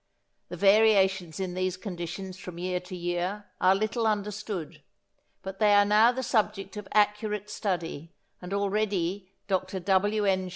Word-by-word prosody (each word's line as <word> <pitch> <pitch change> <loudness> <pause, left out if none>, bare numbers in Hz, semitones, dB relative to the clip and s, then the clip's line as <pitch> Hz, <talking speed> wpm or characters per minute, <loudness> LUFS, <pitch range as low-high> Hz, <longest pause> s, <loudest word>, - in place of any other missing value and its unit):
The - - -6
variations 195 -5 +4
in 185 -2 -3
these 185 0 -1
conditions 185 -1 -6
from 180 -2 -9
year 180 +1 -2
to 180 +1 -9
year 175 +4 -3 0.2
are 185 +1 +5
little 220 +3 0
understood, 210 -5 -3 0.6
but 190 0 -7
they 210 -1 +5
are 205 0 +6
now 215 +3 +5
the 260 +1 -4
subject 210 -4 -1
of 210 -2 -7
accurate 210 0 +1
study, 170 -6 -3 0.3
and 180 +1 -8
already 200 -2 -1 0.2
Dr 190 -1 -1
W. 205 +3 +1
N. 190 -1 +1
195 Hz, 150 wpm, -28 LUFS, 185-210 Hz, 0.6 s, are